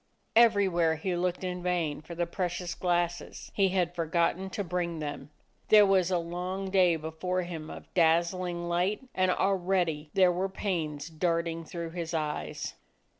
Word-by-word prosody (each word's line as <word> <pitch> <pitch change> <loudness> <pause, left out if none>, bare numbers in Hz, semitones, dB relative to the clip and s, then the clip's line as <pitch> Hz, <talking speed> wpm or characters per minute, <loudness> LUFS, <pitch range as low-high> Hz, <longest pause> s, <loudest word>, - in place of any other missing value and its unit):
Everywhere 195 -8 +4
he 175 +3 -2
looked 180 +1 -1
in 180 -1 -3
vain 175 -5 -1
for 170 +2 -9
the 175 +1 0
precious 175 0 -3
glasses. 175 -1 -2
He 195 -2 +3
had 180 -2 0
for 165 -2 -2
gotten 170 +3 +1
to 205 - -3
bring 175 -1 -2
them! 145 -2 -5 0.4
There 210 -1 +8
was 190 -2 +3
a 185 - +2
long 180 +3 -4
day 180 -3 +5
before 160 +4 -2
him 165 -3 -6
of - - -9
dazzling 175 +1 +2
light, 185 +9 0
and 185 0 +2
already 180 -5 +1
there 185 -2 +6
were 185 +2 -1
pains 160 -7 -3
darting 165 0 -1
through 170 +1 -5
his 170 -1 -4
eyes. 150 -1 -3
175 Hz, 160 wpm, -29 LUFS, 165-185 Hz, 0.4 s, There